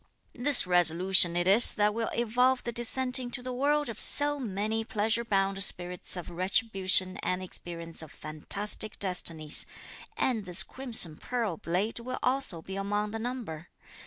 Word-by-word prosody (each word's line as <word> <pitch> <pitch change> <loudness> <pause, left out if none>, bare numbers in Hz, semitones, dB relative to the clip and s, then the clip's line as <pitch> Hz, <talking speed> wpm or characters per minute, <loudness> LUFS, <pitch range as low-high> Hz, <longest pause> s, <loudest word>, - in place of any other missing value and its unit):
"This 270 -1 +2
resolution 175 0 +3
it 175 - 0
is 200 +6 +6
that 210 -1 0
will 225 +1 -3
evolve 250 +2 0
the 235 - -5
descent 250 +2 +2
into 245 -1 -5
the 255 0 -6
world 290 +3 -1
of 230 - -7
so 290 0 +4
many 220 -1 -3
pleasure 225 +2 -2
bound 195 -2 0
spirits 180 -1 -2
of 175 0 -8
retribution 185 0 +2
and 180 - -3
the 185 - -7
experience 170 -2 -10
of 160 - -12
fantastic 200 +8 -2
destinies; 165 -5 +1 0.5
and 225 -6 -1
this 180 0 +4
crimson 225 - +1
pearl 230 -8 -4
blade 180 +9 -3
will 255 +2 -7
also 255 -10 -2
be 190 0 -8
among 205 +1 -3
the 225 - -6
number. 220 -10 -7
210 Hz, 160 wpm, -27 LUFS, 180-240 Hz, 0.5 s, is